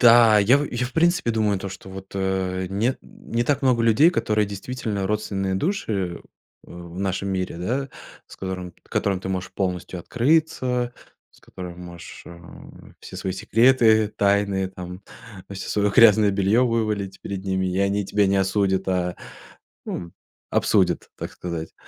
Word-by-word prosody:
Да. 115 -3 +7
Я 115 +7 +5
в 145 - -1
я 125 +1 -1
в 125 - -11
принципе 170 -3 +2
думаю 105 -3 +1
то, 100 +1 -5
что 95 0 -10
вот, 95 0 -10
э, 95 -1 -1
не 110 +7 0
не 120 +1 -4
так 145 +3 0
много 125 -3 +3
людей, 115 +9 +5
которые, 105 - +1
действительно, 100 -1 -4
родственные 100 -2 -1
души, 160 - -1
э, 90 -4 -2 0.5
в 85 -1 -11
в - - -6
нашем 100 0 -1
мире, 95 -3 -2
да, 125 +10 -2 0.4
с - - -13
которым 90 -2 -5
которым 95 -2 -1
ты 95 - -5
можешь 95 -1 -3
полностью 90 -1 -3
открыться, 125 - +1 0.4
с - - -24
которыми 90 -2 -9
можешь, 85 -1 -10
э, 85 0 -11 0.6
все - - -10
свои 95 - -3
секреты, 110 +1 +4
тайны, 100 -2 +1
там, 90 0 -8 0.5
всё 95 -1 -6
своё 105 -1 +1
грязное 110 -2 +6
бельё 100 +5 +3
вывалить 105 -4 -1
перед 95 -1 -6
ними, 95 -1 0
и 90 0 -1
они 100 +1 +1
тебя 100 +1 +2
не 100 +1 +2
осудят, 95 0 +1
а, 90 -1 0 0.7
м, 85 -1 -5 0.4
обсудят, - - +2
так - - -6
сказать. 85 -2 -6
100 Hz, 160 wpm, -23 LUFS, 95-115 Hz, 0.7 s, Да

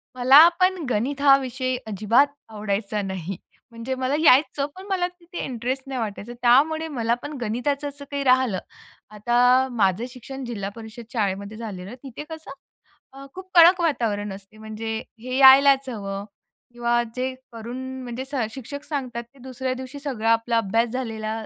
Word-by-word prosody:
मला 270 +6 +8
पण 365 -2 +2
गणित 265 +6 -1
हा 275 -1 +7
विषय 255 -1 -3
अजिबात 220 +7 +3 0.2
आवडायचा 210 0 -2
नाही. 190 -1 -5 0.3
म्हणजे 230 +3 -4
मला 260 +2 -1
यायचं 280 -1 +4
पण 380 +1 -10
मला 360 -2 +1
तिथे 355 0 -11
इंटरेस्ट 255 +1 -3
नाही 265 -2 -4
वाटायचं. 215 +2 -5
त्यामुळे 310 +6 +4
मला 230 0 +1
पण 295 +1 -6
गणिताचं 280 +6 -1
असं 285 0 -11
काही 280 0 -2
राहिलं. 255 -7 +3 0.5
आता 245 +4 +3
माझं 205 0 +1
शिक्षण 265 +2 -9
जिल्हा 200 -5 -4
परिषद 225 +1 -10
शाळेमध्ये 200 -1 -2
झालेलं 200 -5 -7
आहे. 245 - -8
तिथे 270 +2 -8
कसं 315 -3 -10 0.6
अ, 275 0 -11
खूप 375 0 -10
कडक 345 +2 +8
वातावरण 215 -10 -1
असते. 195 +2 -13
म्हणजे 220 +1 -7 0.3
हे 255 +2 -5
यायलाच 275 0 +7
हवं 200 -3 -5 0.5
किंवा 240 0 +1
जे 260 +1 -2 0.2
करून 230 +2 -7 0.3
म्हणजे 245 +2 -6
सर 265 -5 -2
शिक्षक 285 +3 -7
सांगतात 255 -6 -4
ते 275 - -21
दुसऱ्या 260 0 -3
दिवशी 260 +2 -8
सगळा 235 -6 -1
आपला 230 +1 +1
अभ्यास 230 +2 +1
झालेला 225 -3 -4
250 Hz, 160 wpm, -23 LUFS, 220-275 Hz, 0.6 s, मला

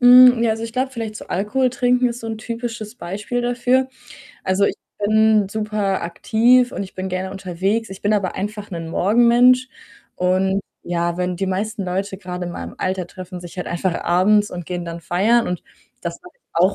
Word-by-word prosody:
Hm, 250 -1 +8
ja, 230 - +3
also, 220 +1 -2
ich 230 0 -5
glaube 260 +2 0
vielleicht 225 -4 -5
so - - -9
Alkohol 230 +8 0
trinken 250 -1 +2
ist 240 0 -6
so 230 - -7
'n 225 -1 -4
typisches 230 -1 -5
Beispiel 210 +4 -4
dafür. 245 +2 +2 0.6
Also, 190 +1 +2
ich - - +1 0.3
bin 215 -1 +4
super 210 -2 -1
aktiv 235 +8 +3
und - - -3
ich 190 - -9
bin 190 0 -4
gerne 185 +1 -3
unterwegs. 195 +4 -2
Ich 190 - -9
bin 205 - +2
aber 200 -3 0
einfach 205 +1 -5
'nen 165 -2 -5
Morgenmensch 240 +7 +4 0.5
und 190 +2 +1 0.2
ja, 170 0 -1
wenn 180 0 -1
die 195 +2 -1
meisten 200 +3 -2
Leute 190 +2 -3
grade 180 -2 -5
in - - -4
meinem - - -7
Alter 185 -1 -2
treffen 180 0 -9
sich 175 0 -10
halt 180 - -4
einfach 175 +1 -1
abends 205 +4 +3
und 175 -2 -6
gehen 175 -1 -4
dann 170 0 -6
feiern 210 +8 +2
und 180 - -3 0.4
das - - -5
mache 360 -1 -14
ich - - -48
auch 185 +4 +4
205 Hz, 195 wpm, -21 LUFS, 185-235 Hz, 0.6 s, Hm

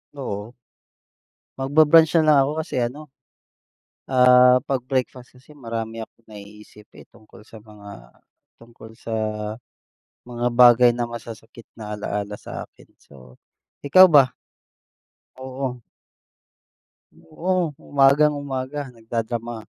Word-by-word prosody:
Oo, 110 -5 -6 1.0
magba-brunch 155 +4 +4
na - - +2
lang 150 -2 +5
ako 140 - -2
kasi 160 - -6
ano, 145 +6 -6 1.0
ah 125 0 +5
'pag 135 -3 -2
breakfast 130 -1 -4
kasi, 150 +4 -19
marami 115 -3 -6
akong 115 +1 -20
naiisip 105 0 -14 0.2
eh, - - -16
tungkol 110 0 -20
sa 110 -2 -15
mga, 100 - -14 0.5
tungkol 115 -1 -15
sa 115 - -6 1.1
mga 120 0 -5
bagay 120 0 +5
na 120 - -2
masasakit 115 -1 -11
na 105 -2 -8
alaala 105 0 -5
sa - - -8
akin, - - -22
so, 65 -3 -19 0.5
ikaw 185 +6 +7
ba? 140 -6 +4 1.0
Oo. 130 -1 -6 1.4
Oo, 180 - -3 0.3
umagang-umaga 140 -1 +1 0.2
nagda-drama, 115 +1 -5
120 Hz, 105 wpm, -21 LUFS, 110-135 Hz, 1.4 s, ikaw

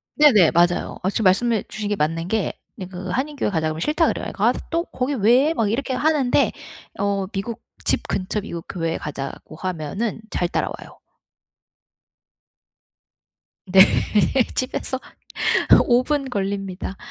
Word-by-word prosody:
네네. 230 - +6
맞아요. 175 +1 +1
마침 200 +4 0
말씀해 215 +4 +3
주신 210 -1 -5
게 205 - +1
맞는 165 +1 -1
게 220 +1 -1 0.2
네 185 - -7
그 185 0 -7
한인 280 +8 -2
교회에 270 - -1
가자고 160 -3 0
그러면 160 - -6
싫다 320 +2 +2
그래요. - - -2
"아 - - +4 0.2
또 335 +2 0
거기 255 +3 -3
왜?" 255 +6 +4
막 225 -8 0
이렇게 260 +2 -1
하는데 290 -3 +2 0.5
어 200 -1 0
미국 210 +4 -5 0.2
집 - - +1
근처 200 +2 -2
미국 170 -5 -7
교회에 165 -3 -2
가자고 145 +1 -7
하면은 185 +6 -3
잘 175 - 0
따라와요. - - -4 2.7
네. 190 0 +6 0.7
집에서 255 0 0 0.9
5 245 0 +4
분 280 0 -1
걸립니다. 195 -3 -3
200 Hz, 270 characters per minute, -22 LUFS, 180-250 Hz, 2.7 s, 네네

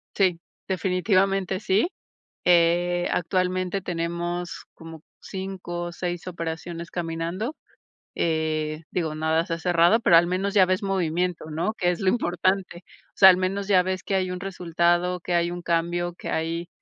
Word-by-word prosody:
Sí, 180 -4 +2 0.3
definitivamente 190 +1 +1
sí. 205 - +2 0.6
Eh, 175 0 +3
actualmente 185 +2 0
tenemos 175 0 -3
como 160 -1 -11 0.2
5 190 -3 -5
o 175 - -5
6 175 0 -4
operaciones 170 0 -5
caminando. 175 - -3 0.6
Eh, 155 -1 -1
digo, 160 -4 -2
nada 160 +2 +1
se 165 - -2
ha - - -6
cerrado, 175 +5 +4
pero 175 -7 +5
al 170 +1 +6
menos 185 +3 -1
ya 195 -3 +5
ves 185 +1 0
movimiento, 180 -3 -1
¿no? 165 +8 -2
Que 180 -4 +1
es 175 - -5
lo 195 - +1
importante. 185 -3 0 0.3
O - - -39
sea, 190 - +8
al 185 - +7
menos 195 +2 -2
ya 185 -3 +5
ves 185 0 -3
que 195 - -1
hay 185 -1 0
un 180 - -5
resultado, 175 -1 0
que 175 +1 -3
hay 170 0 +2
un 175 0 -6
cambio, 175 +1 -1
que - - -7
hay, 165 +1 -2
175 Hz, 160 wpm, -25 LUFS, 170-185 Hz, 0.6 s, sea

